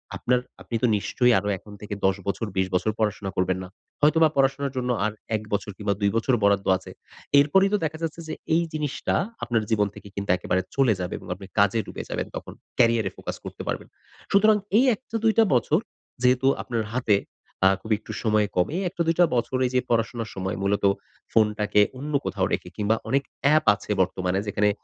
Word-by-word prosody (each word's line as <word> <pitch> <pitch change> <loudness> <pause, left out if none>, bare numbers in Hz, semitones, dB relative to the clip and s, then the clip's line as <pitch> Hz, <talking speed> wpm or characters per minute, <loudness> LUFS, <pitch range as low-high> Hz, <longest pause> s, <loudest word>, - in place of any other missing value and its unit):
আপনার 125 0 +1 0.2
আপনি 120 - -5
তো 125 - +5
নিশ্চয়ই 125 +4 +2
আরো 100 - -5
এখন 105 +2 -14
থেকে 105 0 -6
১০ 95 0 +3
বছর 100 +3 -1
২০ 95 0 +2
বছর 95 +4 +1
পড়াশোনা 105 -2 -1
করবেন 95 0 +1
না। - - -8 0.3
হয়তোবা 155 +2 +5
পড়াশোনার 135 +1 +2
জন্য 125 0 -1 0.2
আর 110 - 0 0.2
১ 110 - -2
বছর 100 0 -1
কিংবা 105 -2 0
২ 100 - +3
বছর 115 +3 +1
বরাদ্দ 100 -1 +3
আছে। 95 - -12 0.5
এরপরেই 190 +8 +4
তো - - +4
দেখা 155 0 -3
যাচ্ছে 165 0 -3
যে, - - -4 0.2
এই 170 - +3
জিনিসটা 150 -3 -2 0.3
আপনার 115 -2 0
জীবন 105 -2 +2
থেকে - - -11
কিন্তু 100 0 -5
একেবারে 95 0 0
চলে 135 -5 +4
যাবে 90 0 -3
এবং - - -12
আপনি 95 +1 -11
কাজে 100 +2 +4
ডুবে - - -7
যাবেন - - -3
তখন - - -7 0.3
ক্যারিয়ারে 115 -4 +3
ফোকাস - - -5
করতে - - -7
পারবেন। - - -3 0.4
সুতরাং, 215 +2 +5 0.2
এই 250 - +5
১ - - -6
টা 230 - -6
২ 225 -1 +4
টা 225 - +7
বছর 145 +7 +2 0.4
যেহেতু 125 +1 +3
আপনার 115 -3 -2
হাতে 115 -5 +3 0.5
আ - - +7
খুবই 110 +1 +1
একটু - - -10
সময় 105 -2 +2
কম, 90 - +3
এই 190 - -1
১ - - -6
টা 170 - +2
২ 165 - +2
টা 175 - +8
বছর 125 +2 0
এইযে 125 0 +1
পড়াশোনার 115 -1 0
সময় 95 +1 -3
মূলত 100 +1 0 0.5
ফোনটাকে 105 -1 +3 0.2
অন্য 150 +3 -5
কোথাও - - 0
রেখে - - -2
কিংবা 105 +1 +2
অনেক 140 +1 +2 0.3
app 155 - +3
আছে 105 - -8
বর্তমানে 95 0 0
যেখানে 105 +1 +2
115 Hz, 205 wpm, -25 LUFS, 100-135 Hz, 0.5 s, টা